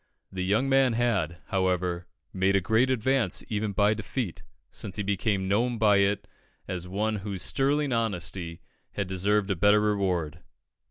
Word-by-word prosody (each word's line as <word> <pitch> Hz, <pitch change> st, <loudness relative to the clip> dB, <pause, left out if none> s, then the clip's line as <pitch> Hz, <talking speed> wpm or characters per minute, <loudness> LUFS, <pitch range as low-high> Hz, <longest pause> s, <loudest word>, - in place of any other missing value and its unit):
The 95 Hz, -1 st, -3 dB
young 105 Hz, +8 st, +1 dB
man 135 Hz, -2 st, +4 dB
had, 105 Hz, -9 st, 0 dB
however, 90 Hz, -2 st, 0 dB, 0.3 s
made 95 Hz, +1 st, +2 dB
a -, -, +5 dB
great 110 Hz, +6 st, +2 dB
advance 130 Hz, -4 st, +1 dB
even 105 Hz, -1 st, -1 dB
by 105 Hz, +2 st, +3 dB
defeat, 110 Hz, -, -4 dB, 0.3 s
since 95 Hz, -, -4 dB
he 105 Hz, -, -2 dB
became 100 Hz, -1 st, 0 dB
known 115 Hz, +5 st, +1 dB
by 105 Hz, -2 st, +4 dB
it 100 Hz, +1 st, +1 dB, 0.4 s
as 90 Hz, -1 st, -4 dB
one 105 Hz, +3 st, -1 dB
whose 100 Hz, -2 st, -4 dB
sterling 140 Hz, 0 st, +1 dB
honesty 90 Hz, -6 st, -2 dB, 0.3 s
had 100 Hz, -, -2 dB
deserved 100 Hz, +2 st, +1 dB
a -, -, +1 dB
better 105 Hz, +4 st, +4 dB
reward. 95 Hz, -7 st, 0 dB
100 Hz, 155 wpm, -27 LUFS, 95-110 Hz, 0.4 s, a